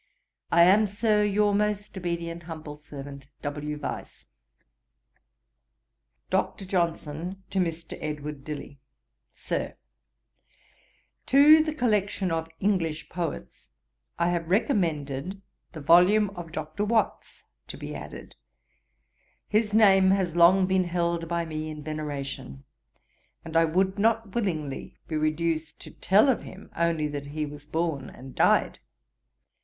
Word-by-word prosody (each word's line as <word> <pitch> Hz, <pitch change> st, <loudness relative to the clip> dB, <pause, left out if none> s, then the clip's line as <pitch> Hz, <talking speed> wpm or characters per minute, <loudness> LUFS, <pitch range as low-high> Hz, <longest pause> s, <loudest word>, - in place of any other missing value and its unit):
I 170 Hz, 0 st, +6 dB
am, 205 Hz, +4 st, +5 dB
Sir, 210 Hz, +1 st, +2 dB
'Your 205 Hz, 0 st, +2 dB
most 210 Hz, 0 st, -1 dB
obedient 170 Hz, -2 st, -4 dB
humble 155 Hz, -2 st, -7 dB
servant, 140 Hz, -2 st, -10 dB, 0.2 s
'W. 150 Hz, +1 st, -4 dB
VYSE.' 145 Hz, -, -6 dB, 2.1 s
'DR. 195 Hz, -, -1 dB
JOHNSON 170 Hz, 0 st, -2 dB
TO 195 Hz, -, 0 dB
MR. 170 Hz, -2 st, -3 dB
EDWARD 150 Hz, -2 st, -5 dB
DILLY. 145 Hz, -2 st, -7 dB, 0.5 s
'SIR, -, -, -4 dB, 1.5 s
'To 300 Hz, +3 st, +7 dB
the 310 Hz, -1 st, -3 dB
collection 210 Hz, -, 0 dB
of 165 Hz, 0 st, -2 dB
English 165 Hz, -6 st, 0 dB
Poets, 165 Hz, -, -5 dB, 0.5 s
I 170 Hz, +1 st, +2 dB
have 170 Hz, -2 st, -2 dB
recommended 180 Hz, -, 0 dB, 0.3 s
the 155 Hz, -, -7 dB
volume 185 Hz, +7 st, +5 dB
of 175 Hz, -4 st, -8 dB
Dr. 155 Hz, +5 st, -4 dB
Watts 220 Hz, 0 st, -1 dB, 0.2 s
to -, -, -7 dB
be -, -, -7 dB
added; -, -, -9 dB, 1.1 s
his 215 Hz, 0 st, +1 dB
name 195 Hz, -3 st, +6 dB
has 190 Hz, -3 st, +1 dB
long 180 Hz, +3 st, +6 dB
been 185 Hz, 0 st, +2 dB
held 170 Hz, -1 st, -1 dB
by 170 Hz, 0 st, -1 dB
me 155 Hz, -1 st, -4 dB
in 150 Hz, -1 st, -7 dB
veneration, 140 Hz, -, -5 dB, 0.8 s
and 165 Hz, 0 st, -8 dB
I 165 Hz, 0 st, +5 dB
would 190 Hz, +5 st, 0 dB
not 225 Hz, -1 st, +1 dB
willingly 160 Hz, -, -3 dB
be 160 Hz, -, -3 dB
reduced 155 Hz, 0 st, -1 dB
to -, -, -11 dB
tell 205 Hz, +8 st, +4 dB
of 265 Hz, -, +2 dB
him -, -, -12 dB
only 165 Hz, -2 st, +1 dB
that 145 Hz, -1 st, -5 dB
he 150 Hz, +1 st, -3 dB
was 145 Hz, 0 st, -10 dB
born 160 Hz, -4 st, -2 dB
and 130 Hz, 0 st, -12 dB
died. -, -, +3 dB
170 Hz, 125 wpm, -27 LUFS, 150-195 Hz, 2.1 s, To